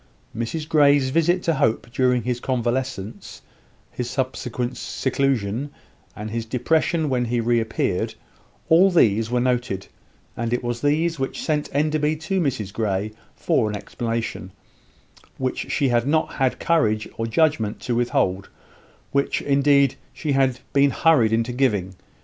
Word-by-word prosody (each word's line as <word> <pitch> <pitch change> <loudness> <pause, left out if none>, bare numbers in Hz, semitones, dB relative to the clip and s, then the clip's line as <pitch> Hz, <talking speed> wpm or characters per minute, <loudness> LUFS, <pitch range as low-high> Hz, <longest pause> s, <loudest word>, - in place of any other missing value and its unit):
Mrs 120 +8 -3
Grey's 145 -4 +4
visit 175 +4 +2
to 165 - +2
Hope 115 -3 0
during 125 -1 +2
his 125 +1 -2
convalescence; 125 -4 -3 0.5
his 125 -1 -4
subsequent 125 -1 -3
seclusion, 130 -2 -1 0.5
and 105 +1 -6
his 115 0 -2
depression 155 +7 0
when 125 -3 0
he 120 +1 -1
reappeared 115 -5 0 0.5
all 175 +4 +6
these 115 - +3
were 125 0 +1
noted; 120 -6 -1 0.5
and 115 +1 -2
it 120 - -1
was 120 0 -3
these 155 +2 +1
which 135 - -3
sent 150 -2 -1
Enderby 150 +1 +1
to 170 +5 -2
Mrs 110 - -2
Grey 105 -1 -1 0.2
for 110 - +1
an 105 - -3
explanation, 115 -3 -4 0.9
which 130 -1 -3
she 140 -3 +1
had 120 +1 +1
not 155 +2 +1
had 130 -2 0
courage 110 -10 +1
or 115 - -2
judgment 115 -4 +1
to 125 - -2
withhold 120 -6 0 0.6
which, 140 0 +1
indeed, 140 -1 +3 0.2
she 155 - -3
had 135 -2 +1
been 140 0 +5
hurried 135 -7 +3
into 115 +2 0
giving. 105 -8 0
125 Hz, 140 wpm, -23 LUFS, 115-145 Hz, 0.9 s, all